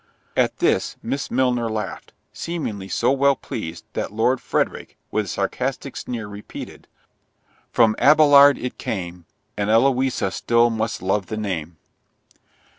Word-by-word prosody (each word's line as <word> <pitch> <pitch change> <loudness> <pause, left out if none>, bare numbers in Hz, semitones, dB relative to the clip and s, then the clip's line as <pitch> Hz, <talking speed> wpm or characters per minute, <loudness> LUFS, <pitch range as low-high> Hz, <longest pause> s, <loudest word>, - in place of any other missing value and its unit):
At - - +1
this - - +1
Miss 140 - -3
Milner 125 -3 +1
laughed, 105 -4 -5 0.2
seemingly 115 - -4
so 120 +5 +1
well 140 0 +3
pleased, 85 -10 -7
that - - -3
Lord 115 +4 +1
Frederick, - - -2
with 105 -1 0
a - - -11
sarcastic 130 +7 -3
sneer, 115 -4 -5
repeated, 105 0 -9 0.8
"From 110 -2 +4
Abelard 145 -1 +7
it 125 - -6
came, 90 -4 -5 0.3
And 100 0 -1
Eloisa 130 -2 +2
still 115 +3 +2
must 110 -3 -3
love 95 +1 0
the 110 - -4
name." 85 -6 -4
115 Hz, 130 wpm, -22 LUFS, 100-130 Hz, 0.8 s, Abelard